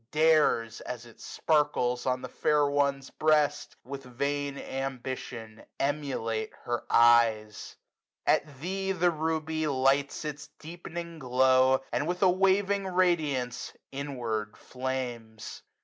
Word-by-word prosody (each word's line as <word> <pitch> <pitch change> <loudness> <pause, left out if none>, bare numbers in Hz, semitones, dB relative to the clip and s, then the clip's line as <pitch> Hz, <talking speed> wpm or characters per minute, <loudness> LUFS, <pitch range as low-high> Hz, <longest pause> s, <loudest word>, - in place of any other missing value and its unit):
Dares, 150 -8 +3
as 120 -1 -6
it 115 - -16
sparkles 125 -6 0
on 130 0 0
the - - -4
fair 150 -1 +2
one's 140 -1 0
breast, 155 -2 +1
145 - - -54 0.2
With 120 - -18
vain 140 0 -1
ambition 130 -5 -5 0.2
emulate 135 -6 -2
her 120 0 -3
eyes. 115 -3 +3 0.5
At 140 -3 +1
thee 195 +3 -2
the 175 -1 +2
Ruby 160 0 -1
lights 135 +2 +1
its 150 0 -5
deepening 170 0 -8
glow, 130 0 +4
And 150 - -1
with 180 +2 -1
a 185 - +6
waving 195 +1 +2
radiance 155 -9 0 0.2
inward 120 -6 -4
flames. 125 -4 -5
140 Hz, 115 wpm, -29 LUFS, 125-155 Hz, 0.5 s, a